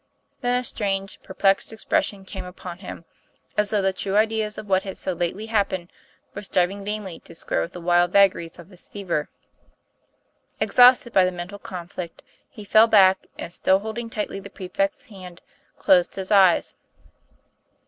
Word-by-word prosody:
Then 245 -1 +1
a - - -5
strange, 195 -4 -3
perplexed 195 +2 +1
expression 205 -2 -1
came 190 -1 -7
upon 180 -1 -9
him, 180 -3 -9 0.5
as 210 -1 +2
though 210 -2 +1
the 190 0 +1
true 195 +1 -2
ideas 215 0 +1
of 215 - -7
what 190 -1 +2
had 190 -1 -7
so 185 - -2
lately 175 +5 -3
happened 200 -5 -1 0.4
were 205 - -6
striving 195 0 0
vainly 205 -4 -5
to 165 - -15
square 125 - -2
with 80 - -5
the - - -8
wild 175 0 +3
vagaries 190 -4 +3
of 170 0 -13
his 185 - -14
fever. 180 -7 -3 1.3
Ex - - -1
hausted 245 -1 +7
by 190 - +5
the 185 - +1
mental 180 +3 -7
conflict, 175 -2 -8 0.3
he 215 - -11
fell 215 +2 +5
back 190 -3 +5
and, 170 - -6
still 190 +1 +3
holding 220 +3 -6
tightly 210 -3 -4
the 200 +1 -10
prefect's 285 +12 -3
hand, 185 -7 -12 0.4
closed 180 -2 +3
his 190 +1 -5
eyes. 190 -4 +4
195 Hz, 170 wpm, -23 LUFS, 180-210 Hz, 1.3 s, hausted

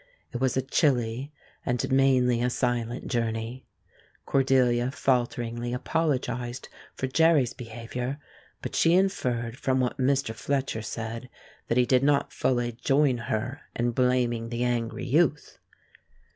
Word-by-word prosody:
It 120 - -4
was 130 -1 +1
a 130 - +1
chilly 130 -1 +1 0.3
and 125 -1 -1
mainly 130 -3 +3
a 125 - +2
silent 120 -1 -1
journey. 115 +1 -2 0.6
Cordelia 130 -2 +3
falteringly 120 -2 -1
apologized 125 -4 -2 0.3
for - - -2
Jerry's 150 -2 +3
misbehavior, 125 +3 -5 0.5
but - - -5
she 165 +1 +4
inferred 125 -12 0
from 130 -1 0
what 130 +2 -1
Mr. 135 -3 +1
Fletcher 135 -3 -2
said 115 +2 -5 0.4
that 115 - 0
he 125 - +5
did 125 0 +3
not 140 0 +2
fully 120 -2 0
join 135 +2 +2
her 125 +7 -2
in 120 0 0
blaming 120 -2 +1
the 120 +1 -2
angry 120 -2 -1
youth. 150 +2 +1
125 Hz, 130 wpm, -27 LUFS, 120-135 Hz, 0.6 s, he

